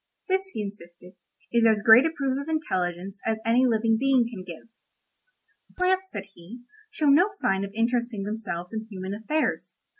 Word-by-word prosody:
This, 380 0 +1
he 215 - -2
insisted, 180 -3 -10 0.4
is 235 -1 +3
as 220 -2 +3
great 225 +7 +8
a - - 0
proof 275 -4 -2
of 285 - -8
intelligence 190 - -3
as 225 0 0
any 245 +3 +4
living 225 -1 +2
being 265 -3 +3
can 215 -6 -8
give. 170 +1 -10 1.1
"Plants," 375 +1 +1
said 200 - -5
he, 210 +9 -12 0.3
"show 310 - -3
no 295 +8 +5
sign 195 - 0
of 200 - -5
interesting 235 -2 0
themselves 195 -4 -5
in 220 0 -5
human 190 -1 -6
affairs. 260 +10 -2
225 Hz, 170 wpm, -26 LUFS, 195-275 Hz, 1.1 s, great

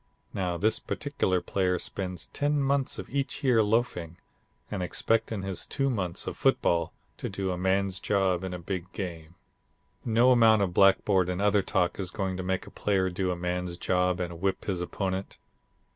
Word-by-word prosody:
Now 90 -3 -1
this 110 +5 +2
particular 120 -11 -1
player 90 -2 0
spends 90 -3 -4
ten 145 0 +1
months 140 -1 +1
of - - -6
each 140 +1 -2
year 125 -4 +4
loafing, 105 -6 0 0.5
and 100 -3 -2
expects 110 +5 0
in 105 -4 -3
his 95 -2 -3
two 135 -1 0
months 90 -7 -2
of - - -4
football 85 -1 +2 0.3
to - - -4
do 95 -1 -2
a - - -1
man's 95 0 +1
job 95 -3 +1
in 95 - -3
a 90 - -4
big 90 +1 -5
game. 85 -4 -6 0.7
"No 120 +2 +4
amount 110 -4 +6
of 90 -3 -2
blackboard 95 -1 +4
and 90 0 -2
other 105 0 +3
talk 90 -1 0
is 95 -2 -3
going 95 -1 -2
to - - -3
make 95 0 -2
a - - -12
player 95 -2 0
do 95 +1 -1
a 90 - 0
man's 90 0 -3
job 90 0 +1
and 85 -2 -4
whip 95 -1 -1
his 95 -3 -1
opponent. 95 +1 -3
95 Hz, 185 wpm, -28 LUFS, 90-105 Hz, 0.7 s, amount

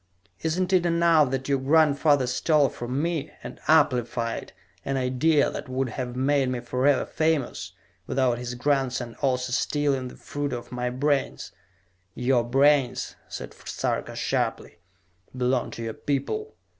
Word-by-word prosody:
"Isn't 180 +4 0
it 180 -2 +4
enough 170 -4 +4
that 135 0 -3
your 140 -1 +1
grandfather 145 -1 +4
stole 145 +3 +2
from 125 +5 -3
me, 165 -4 -1
and - - -8
amplified, 125 -6 +2 0.3
an 135 0 -1
idea 135 +4 +2
that - - -7
would 130 0 -1
have 125 +1 -5
made 135 0 +2
me 125 -1 -2
forever 130 +3 +1
famous, 150 - -1 0.3
without 125 -3 +1
his 125 0 -5
grandson 130 -3 -1
also 130 -2 0
stealing 140 -2 0
the - - -10
fruit 145 -1 -4
of 120 -1 -6
my 125 0 -2
brains?" 140 +2 -1 0.6
"Your 125 -1 +2
brains," 135 +1 +2
said - - -7
Sarka - - -3
sharply, - - -2 0.6
"belong 125 0 +1
to 115 - -7
your 115 -1 -3
people. 145 - -3
135 Hz, 140 wpm, -26 LUFS, 125-145 Hz, 0.6 s, it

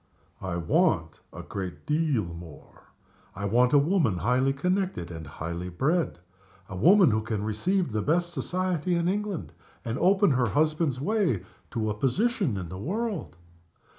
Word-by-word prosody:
"I 95 -3 -3
want 85 - +1
a - - -8
great 95 -3 -6
deal 150 -7 +1
more. 85 -3 -11 0.5
I 100 +2 -4
want 120 +5 +3
a 145 - +6
woman 145 - +2
highly 125 +7 +2
connected 180 - -1
and 80 -2 -7
highly 85 +4 -5
bred 155 - 0 0.5
a 95 - -7
woman 180 - +6
who 110 +1 +1
can 110 -2 -3
receive 170 - 0
the 105 0 -1
best 175 +7 0
society 180 +3 -1
in 170 0 +1
England, 200 -2 -2 0.3
and 115 +2 -2
open 195 -1 +4
her 125 -2 +2
husband's 155 0 +1
way 170 - +1 0.3
to 110 -3 -1
a - - -1
position 165 - 0
in 90 -3 -5
the 95 - -7
world." 205 - -3
135 Hz, 155 wpm, -27 LUFS, -, 0.5 s, a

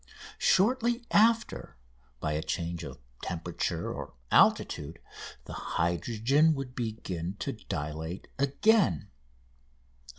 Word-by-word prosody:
Shortly 235 +4 +3
after, 230 - +3 0.4
by 75 - -1
a 75 - -1
change 85 0 -3
of - - -7 0.2
temperature 85 0 -3
or - - -7 0.2
altitude, 75 +3 +3 0.5
the - - -8
hydrogen 120 - +1
would 135 -2 -5
begin 100 -7 -4
to 140 - -3
dilate 80 -3 -5
again. 140 - +3
110 Hz, 95 wpm, -29 LUFS, -, 0.5 s, Shortly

